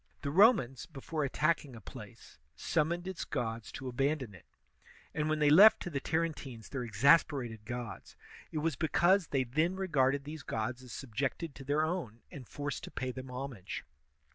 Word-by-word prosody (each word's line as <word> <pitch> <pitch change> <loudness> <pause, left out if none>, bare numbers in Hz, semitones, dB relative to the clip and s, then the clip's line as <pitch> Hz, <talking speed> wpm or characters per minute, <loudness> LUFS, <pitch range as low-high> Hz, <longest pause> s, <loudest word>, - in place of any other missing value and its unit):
The 140 - -1
Romans, 175 - +4
before 155 +1 -4
attack 155 +4 +1
ing 135 -4 -12
a - - -9
place, 95 - -12 0.2
summoned 170 - 0
its 190 -2 -4
gods 115 -1 -3
to 135 - -6
abandon 135 -2 -1
it; 90 - -16 0.7
and 150 +1 -1
when 155 - +1
they 150 -1 +4
left 200 +8 +9
to 175 - -5
the 140 - -1
Tarentines 145 -7 -3
their 135 -3 -3
exasperated 120 -1 +3
gods, 120 -5 -6 0.4
it - - -4
was 155 -1 0
because 175 +3 +3
they 135 -2 +1
then 155 +9 0
regarded 140 -7 +1
these 155 +2 -7
gods 120 0 -3
as 125 -2 -12
subjected 140 +5 -3
to 135 - -10
their 145 +3 +1
own 155 - -3
and 130 -5 -9
forced 145 -1 -4
to - - -9
pay 130 -1 -3
them 130 +1 -8
homage. 125 -6 -6
140 Hz, 175 wpm, -32 LUFS, 125-160 Hz, 0.7 s, left